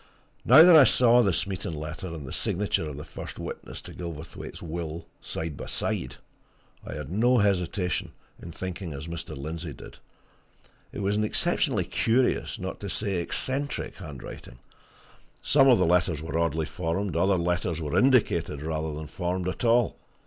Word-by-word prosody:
Now 155 - +9
that 175 -1 +8
I 155 - +10
saw 125 0 +5
the 100 -5 +3
Smeaton 90 -2 -2
letter 75 +4 -6
and 80 -4 -7
the 65 - -7
signature 90 -4 -1
of 70 - -7
the 75 - -6
first - - -8
witness - - -7
to - - -10
Gilverthwaite's 85 -2 -7
will, 85 0 -5
side 80 -2 -5
by - - -7
side, 65 -1 -2 0.7
I - - -7
had 75 0 -6
no 120 +6 +3
hesitation 90 -3 0 0.3
in 85 - -8
thinking 90 -1 -5
as 70 +1 -6
Mr. 85 -4 -6
Lindsey 80 +2 -5
did. - - -12 0.9
It - - -5
was 100 +1 +1
an 105 - +1
exceptionally 105 - +1
curious, 125 +3 +1
not - - -5
to - - -5
say 100 -3 -1
eccentric, 135 +11 -2
handwriting 70 -8 -9 0.8
some 135 -2 +4
of 125 -3 +7
the 90 - +3
letters 85 -2 +2
were 80 +1 -5
oddly 80 -1 0
formed, 90 +4 -2
other 95 +3 +3
letters 85 -1 -1
were 75 -3 -3
indicated 105 - +3
rather 80 -1 -2
than 80 +1 -6
formed 90 +3 -3
at 90 - -3
all. 120 -1 +3
85 Hz, 165 wpm, -27 LUFS, 80-100 Hz, 0.9 s, I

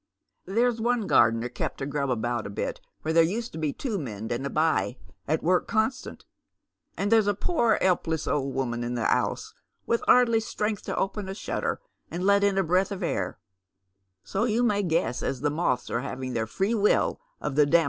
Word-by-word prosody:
There's 230 +3 +1
one 235 -1 +1
gardener 115 - +4
kept 125 - -4
to 135 - -3
grub 140 -1 -2
about 120 -2 -1
a - - -7
bit, 100 - -4 0.2
where 160 - -1
tiiere 165 0 +5
used 230 +6 -3
to 160 - -7
be 155 -2 0
two 220 - -3
men 110 -6 -5
and 120 +3 -2
a 140 - -2
by 155 -5 +1 0.3
at 155 +2 0
work 180 +2 +2
constant, 230 +4 -1 0.7
and 200 +2 -1
there's 220 -2 +5
a 205 - +2
pore 235 - +2
'elpless 170 -4 +1
old 135 -2 -1
woman 120 -3 -1
in 120 +1 -3
the 120 - -1
'ouse, 440 - 0 0.3
with 235 - 0
'ardly 235 -2 +5
strength 210 -1 -2
to - - -3
open 195 0 -2
a 190 - -4
shutter - - -2 0.3
and 175 +2 -4
let 200 0 +4
in 200 -1 +2
a 195 - +3
breath 185 +4 +2
of 195 -1 -4
air, 170 - -2 0.9
so 195 +4 -1
ymi 235 +2 +2
may 205 -3 +2
guess 160 - 0
as 130 -2 -2
the 150 - +1
moths 145 -6 -1
are - - 0
having 130 -1 -5
their 110 -1 -1
free 195 - 0
will 210 - +2 0.2
of 150 - -3
the 145 +1 +4
dam 170 +3 +5
175 Hz, 205 wpm, -27 LUFS, 135-210 Hz, 0.9 s, tiiere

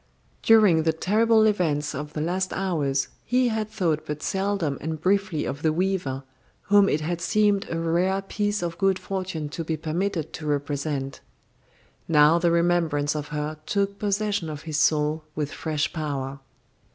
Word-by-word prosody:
During 210 -8 +5
the 160 0 +1
terrible 220 +6 +3
events 160 -9 +1
of 150 +2 -6
the 150 - -3
last 185 +3 -1
hours 150 -8 0 0.2
he 250 0 +2
had 220 -1 -2
thought 165 -7 0
but 150 0 -4
seldom 190 -7 -1
and 160 +1 -4
briefly 190 -2 +1
of 140 +2 -4
the 160 - +2
weaver, 170 -6 -1 0.4
whom 200 -1 +5
it 150 - 0
had 170 +2 -3
seemed 205 +3 +2
a 165 - -2
rare 175 +4 +1
piece 205 0 -1
of 170 -1 -4
good 195 -1 +3
fortune 185 -6 -4
to 165 +3 -5
be 160 0 -2
permitted 165 +1 -2
to 155 - -6
represent. 145 -1 -2 0.9
Now 155 +1 +5
the 170 0 +2
remembrance 170 -4 +1
of 150 -1 -3
her 150 +1 -4
took 200 0 -1
possession 205 -4 -1
of 150 -1 -7
his 155 -2 -3
soul 150 +1 +2
with 150 -1 -2
fresh 155 -2 -2
power. 140 -4 -3
165 Hz, 165 wpm, -25 LUFS, 150-195 Hz, 0.9 s, During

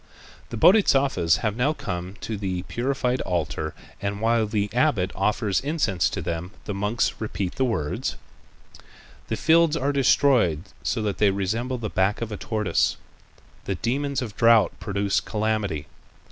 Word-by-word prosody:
The 115 - -5
Bodhisattvas 135 - +4
have 105 -1 0
now 130 +6 +1
come 90 - -5
to 110 - -4
the 95 -3 -3
purified 125 +6 -1
altar 80 -3 -2 0.3
and 100 0 -2
while 115 0 +2
the 105 -1 0
abbot 120 -8 +2
offers 100 0 0
incense 140 - 0
to - - -4
them, 85 +1 -3 0.2
the 105 - -3
monks 105 +4 0
repeat 100 -4 -3
the 130 - 0
words: 80 -12 -2 1.1
"The - - -2
fields 165 -1 +4
are 145 -1 0
destroyed 125 - +3 0.2
so 115 - -1
that 105 -2 -2
they 105 - +5
resemble 110 +7 -1
the 115 -3 -4
back 95 0 +1
of 115 -1 -4
a 105 - -4
tortoise. 105 -6 0 0.7
The 95 - -1
demons 135 - -1
of 105 -5 -7
drought 115 -2 +5
produce 100 -1 0
calamity. 105 -8 -2
105 Hz, 150 wpm, -24 LUFS, 95-125 Hz, 1.1 s, they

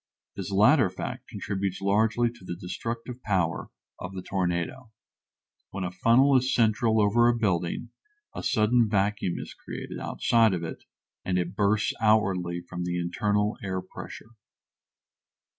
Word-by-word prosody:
This 95 -1 -5
latter 105 +4 +5
fact 90 - -6
contributes 95 -1 -3
largely 110 +4 +2
to 120 -4 -17
the 90 - -5
destructive 115 +7 -5
power 90 -6 -1 0.3
of 90 +1 -7
the 95 - -5
tornado. 95 +7 -2 0.8
When 100 -1 -5
a 90 - -3
funnel 120 +9 +4
is 130 0 +2
central 110 -1 +3
over 110 +3 +4
a 120 - +2
building 95 +1 -1 0.4
a - - -5
sudden 110 +1 +3
vacuum 100 -3 0
is - - -7
created - - -7
outside 115 -4 +2
of 85 - -4
it 80 - -7 0.4
and 90 -1 0
it 90 +1 -2
bursts 105 +1 +2
outwardly 95 -6 +2
from 90 0 -6
the 90 0 -2
internal 105 +4 0
air 95 -1 -2
pressure. 95 +4 -10
100 Hz, 140 wpm, -27 LUFS, 90-115 Hz, 0.8 s, latter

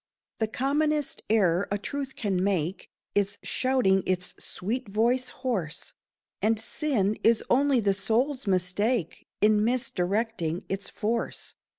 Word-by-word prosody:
The 220 - +1
commonest 295 +5 0
error 195 -4 +3
a 205 - +1
truth 270 +6 -5
can 190 -5 0
make 190 -2 -1 0.2
Is 200 0 +1
shouting 255 -8 +2
its 180 -1 -1
sweet 230 +6 -3
voice 240 +5 +2
hoarse, 200 - -3 0.5
And 220 0 +2
sin 220 -5 0
is 230 -1 +4
only 275 0 +4
the 200 -2 +3
soul's 235 +6 0
mistake 185 +2 0
In 210 0 +4
misdirecting 215 -6 -1
its 195 0 -3
force. 230 +2 -3
215 Hz, 120 wpm, -27 LUFS, 195-255 Hz, 0.5 s, is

